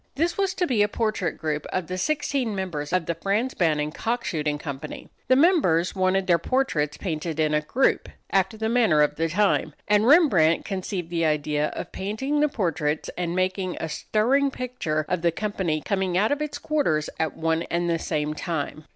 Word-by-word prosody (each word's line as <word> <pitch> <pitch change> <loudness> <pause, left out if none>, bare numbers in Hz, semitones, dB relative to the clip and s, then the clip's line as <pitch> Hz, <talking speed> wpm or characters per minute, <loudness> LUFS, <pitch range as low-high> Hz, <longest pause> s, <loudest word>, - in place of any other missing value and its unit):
This 330 +5 0
was 390 -2 0
to 360 - +1
be 245 -9 +1
a 205 - +4
portrait 215 -4 -1
group 150 -1 -3
of 185 -2 -1
the 180 - -4
sixteen 270 0 -1
members 170 -6 -4
of 180 -2 +1
the 170 - -1
Frans 210 +9 -1
Banning 150 -4 +1
Cock 235 +8 -2
Shooting 150 -2 -1
Company. 145 0 -7 0.2
The 255 - +5
members 265 - +3
wanted 185 0 +2
their 170 -2 +3
portraits 165 - 0
painted 160 -3 -4
in 155 -1 +2
a 150 - +2
group, 250 - +1 0.2
after 195 +3 +1
the 220 0 -1
manner 220 -11 +4
of 150 - 0
the 165 +1 0
time, 175 -4 +1
and 210 +2 +3
Rembrandt 200 - +5
conceived 185 -3 -4
the 165 -2 +1
idea 150 0 0
of - - -6
painting 240 +10 -2
the 300 0 +3
portraits 160 - -1
and 175 -1 -2
making 185 0 -1
a 160 - -3
stirring 250 - +1
picture 250 - -3
of 180 -2 -1
the 170 0 +2
company 180 -5 -2
coming 190 -1 -1
out 210 +6 +2
of 290 +1 0
its 300 -1 -3
quarters, 220 - 0
at 160 - -1
one 165 0 0
and 175 0 0
the 165 -1 0
same 150 -1 -2
time. 155 -1 -4
185 Hz, 195 wpm, -25 LUFS, 155-225 Hz, 0.2 s, The